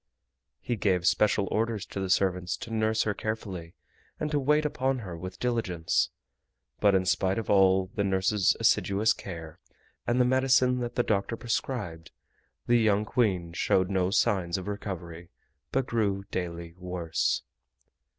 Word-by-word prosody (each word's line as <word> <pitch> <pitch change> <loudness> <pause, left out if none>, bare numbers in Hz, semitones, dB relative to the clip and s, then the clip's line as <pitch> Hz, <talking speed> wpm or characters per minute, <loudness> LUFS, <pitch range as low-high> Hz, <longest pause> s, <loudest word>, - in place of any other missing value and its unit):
He 120 - -2
gave 95 -4 +1
special 105 0 +3
orders 110 -2 -1
to - - -6
the 95 -1 -2
servants 90 -1 +1
to 115 - -7
nurse 110 0 +1
her 105 - 0
carefully 95 -6 -5 0.4
and 150 0 -2
to 145 - +2
wait 150 +3 +2
upon 135 -2 0
her 95 -8 -6
with 90 +2 -7
diligence, 110 -9 0 0.7
but 100 -2 +4
in 95 -1 +2
spite 95 +1 +1
of 115 - -2
all 95 -1 +4
the 100 - 0
nurses' 95 +1 +2
assiduous 105 +3 +3
care 80 -4 -9 0.5
and 120 +1 +2
the 125 - +5
medicine 130 0 +3
that 120 -1 -4
the 120 - +2
doctor 105 +1 -1
prescribed, 110 -9 -3 0.6
the 120 0 +4
young 105 -2 +2
Queen 95 -9 0
showed 95 +2 +1
no 95 -1 +1
signs 95 -4 +1
of 95 - -6
recovery, 85 -5 -6 0.4
but 135 -1 +1
grew 100 -5 0
daily 85 -2 -4
worse. 90 -3 -1
100 Hz, 150 wpm, -28 LUFS, 90-115 Hz, 0.7 s, the